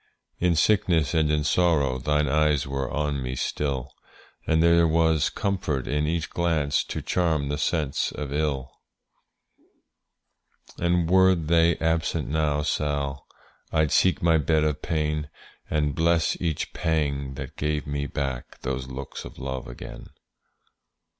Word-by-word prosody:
In 90 -1 +2
sickness 80 -5 +2
and 80 -2 +2
in 75 0 +1
sorrow 75 -6 +2
Thine 75 +3 +1
eyes 75 -1 +2
were 70 -1 -3
on 75 -2 -1
me 65 0 -3
still, 70 -1 -2 0.5
And 80 0 +3
there 85 0 +5
was 80 -1 +2
comfort 95 - -2
in 75 +1 0
each 80 +1 -2
glance 80 -4 +1
To - - -5
charm 80 -6 0
the 75 0 -2
sense 75 -4 0
of 75 -2 -5
ill. 70 -3 -1 2.1
And 85 -1 +2
were 95 +1 +5
they 85 0 +2
absent 80 -1 0
now, 75 -1 +1
Sall, 70 -2 -2 0.4
I'd 80 -3 +2
seek 90 -4 +3
my 80 -2 +4
bed 75 +1 +2
of 75 -2 -1
pain, 75 -2 -1 0.4
And 75 -2 0
bless 85 +1 +2
each 80 -4 -2
pang 70 -4 -1
that 65 -1 -7
gave 75 0 -1
me 70 0 -3
back 70 -4 -4
Those 65 0 -3
looks 65 +1 -7
of - - -11
love 65 -1 -5
again. - - -9
75 Hz, 140 wpm, -25 LUFS, 70-80 Hz, 2.1 s, there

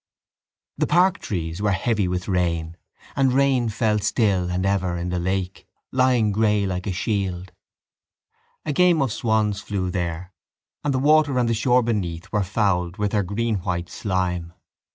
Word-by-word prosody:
The - - +2
park 180 +3 +3
trees 85 -2 -4
were 105 -1 +2
heavy 105 0 0
with 90 0 -3
rain; 85 -3 -1 0.4
and 135 -2 +3
rain 130 -3 +2
fell 110 -1 +1
still 100 -4 +1
and 90 +1 -1
ever 95 -3 0
in 85 +1 -3
the 90 0 -1
lake, 95 +1 -3 0.2
lying 125 -4 +3
grey 105 -1 +2
like 90 0 -3
a - - 0
shield. 95 -2 -2 1.1
A 150 - -1
game 175 +1 +4
of 125 -6 -2
swans 110 -3 0
flew 95 -3 -3
there 90 0 -4 0.5
and 145 - 0
the 130 - 0
water 145 0 +3
and 120 -1 +2
the 115 - +1
shore 125 +2 +3
beneath 90 -7 -3
were 105 - +1
fouled 95 -2 0
with 105 -1 -1
their 105 - +2
greenwhite 95 -4 -2
slime. 90 -4 -2
100 Hz, 160 wpm, -23 LUFS, 90-115 Hz, 1.1 s, game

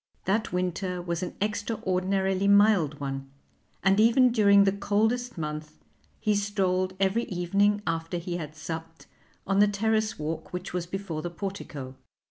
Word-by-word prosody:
That 210 +4 0
winter 180 +1 -2
was 170 -1 -3
an 180 - -4
extraordinarily 195 -2 0
mild 200 -7 +4
one, 135 -1 -4 0.5
and 195 +2 +4
even 240 +3 +5
during 200 -3 +6
the 195 - +3
coldest 220 +4 0
month 150 -1 -5 0.4
he 215 -1 +1
strolled 190 -2 0
every 195 +5 +1
evening 200 +3 +1
after 165 +1 -2
he 175 0 -4
had 155 -2 -7
supped 165 +1 -7 0.4
on 195 +1 +1
the 205 - +6
terrace 215 +1 0
walk 155 +1 -4
which 180 0 -5
was 175 -1 -2
before 180 -4 -4
the 175 - -4
portico. 170 -8 -6
190 Hz, 145 wpm, -27 LUFS, 170-205 Hz, 0.5 s, during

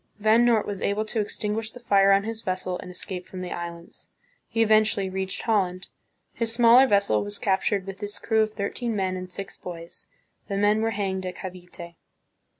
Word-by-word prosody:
Van 220 +3 +4
Noort 235 -3 +3
was 200 -1 -5
able 210 +2 0
to 215 0 -1
extin 210 0 -3
guish 220 0 -3
the 245 - -11
fire 200 -4 +4
on 195 0 +4
his 225 +1 -5
vessel, 185 -1 -3
and - - -8
escape 180 0 -7
from 185 - -7
the 180 - -5
Islands. 170 0 -7 0.4
He 225 0 +2
eventually 215 -3 +3
reached 190 0 -3
Holland. 190 -5 0 0.4
His 230 -1 -2
smaller 240 +3 +6
vessel 200 - +2
was 100 0 -6
captured 195 0 0
with 195 +1 -8
its 205 0 -4
crew 220 -1 +1
of 215 0 +1
thirteen 220 +3 -3
men 190 -2 0
and 185 0 -6
six 195 +2 -7
boys. 170 -1 -9 0.4
The 200 - -2
men 205 +2 +3
were 225 - +1
hanged 190 -3 -2
at 180 - -5
Cavite. 180 -2 -9
200 Hz, 195 wpm, -25 LUFS, 185-220 Hz, 0.4 s, smaller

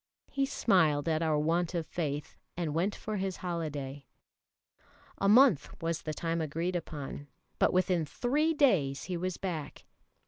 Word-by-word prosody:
He 275 -1 +1
smiled 160 - +2
at 160 -1 +1
our 160 -2 +2
want 165 +4 +1
of 165 -2 -1
faith, 150 -4 -3 0.2
and 165 -4 -1
went 180 +6 0
for 215 -1 -4
his 190 -1 -2
holiday. 145 -5 -4 1.1
A 200 - +3
month 215 - +5
was 165 -1 -2
the 155 - -4
time 165 +1 -1
agreed 165 +4 -2
upon, 145 -4 -5 0.3
but - - +4
within 185 -2 +2
three 300 - +1
days 175 - +3
he 185 - -3
was 180 +1 -2
back. 165 -6 -5
170 Hz, 150 wpm, -31 LUFS, 150-190 Hz, 1.1 s, month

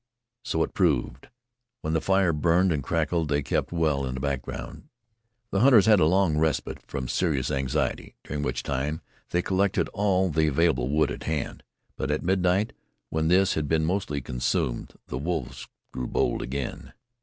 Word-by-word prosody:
So 80 - 0
it - - -5
proved. 70 -8 0 0.5
When 80 - -2
the 80 - +1
fire 95 -3 +2
burned 85 +4 +3
and 75 -3 0
crackled 80 +2 0
they 70 0 +1
kept - - -1
well 80 -5 +1
in 65 - -4
the - - -4
background. 70 - -5 0.6
The 100 - +1
hunters 120 -4 +6
had 110 -3 +6
a 75 - +4
long 90 -3 +3
respite 80 -1 -1
from 65 -3 -4
serious 70 -4 0
anxiety, 65 -2 -1
during 75 0 -4
which 65 -4 -2
time 70 +3 -2 0.3
they 90 0 0
collected 95 0 +1
all 95 -3 +1
the 80 +1 +2
available 75 -3 +2
wood 75 0 +2
at - - -6
hand. 80 -2 -3 0.4
But 65 - -2
at 75 - -1
midnight, 95 +3 +1 0.4
when 80 0 0
this 95 +3 +4
had 75 -2 -1
been 80 +1 +2
mostly 85 -5 -1
consumed, 60 0 -2
the 65 - -5
wolves 80 -3 -3 0.2
grew 65 -1 -4
bold - - 0
again. 65 +1 -5
80 Hz, 170 wpm, -26 LUFS, 70-90 Hz, 0.6 s, hunters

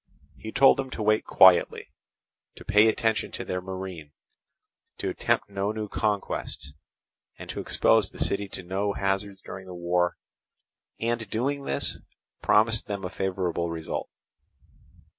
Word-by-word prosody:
He 110 - -8
told 135 +3 +6
them 135 -1 -3
to 110 - -4
wait 110 +1 +2
quietly, 95 -2 +5 0.6
to - - -12
pay 105 +2 +5
attention 110 0 +1
to - - -5
their 90 0 -3
marine, 95 -5 -7 0.8
to - - -2
attempt - - 0
no 100 +1 -2
new 110 -1 -4
conquests, 100 -9 -3 0.6
and - - -9
to - - -6
expose - - +3
the - - -15
city 100 0 0
to 95 - -8
no 100 +3 -1
hazards 95 0 -2
during 95 0 -9
the 90 - -8
war, 90 0 0 0.8
and 115 -2 -2
doing 140 +6 -1
this, 70 - -1 0.4
promised 110 +1 +3
them 100 -2 -4
a 90 - -5
favourable 90 -3 -2
result. 80 -1 -4
100 Hz, 140 wpm, -27 LUFS, 90-110 Hz, 0.8 s, told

